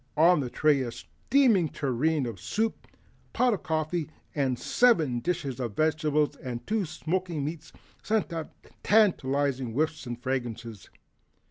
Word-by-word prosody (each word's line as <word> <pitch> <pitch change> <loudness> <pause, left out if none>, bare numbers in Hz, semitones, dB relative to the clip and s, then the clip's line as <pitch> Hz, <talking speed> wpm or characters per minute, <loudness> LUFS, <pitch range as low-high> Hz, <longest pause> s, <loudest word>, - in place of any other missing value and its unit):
On 170 +2 +6
the 130 -3 -2
tray 150 +1 +3
a 120 -2 -3
steaming 230 - +2
tureen 140 +2 0
of 115 -6 -6
soup, 220 - -2
a - - -31 0.4
pot 250 -2 +4
of 205 - -3
coffee, 160 -2 -2 0.5
seven 160 - +3
dishes 150 -4 -2
of 120 -5 -3
vegetables 155 -2 +1
and 120 -2 -6
two 220 +1 0
of 175 - -4
smoking 170 -3 -2
meats 155 +1 -6 0.3
sent 215 -5 0
up 160 -2 -5 0.3
tantalizing 140 - +2
whiffs 155 +1 -1
and 120 0 -5
fragrances. 120 -5 -4
155 Hz, 140 wpm, -28 LUFS, 130-175 Hz, 0.5 s, On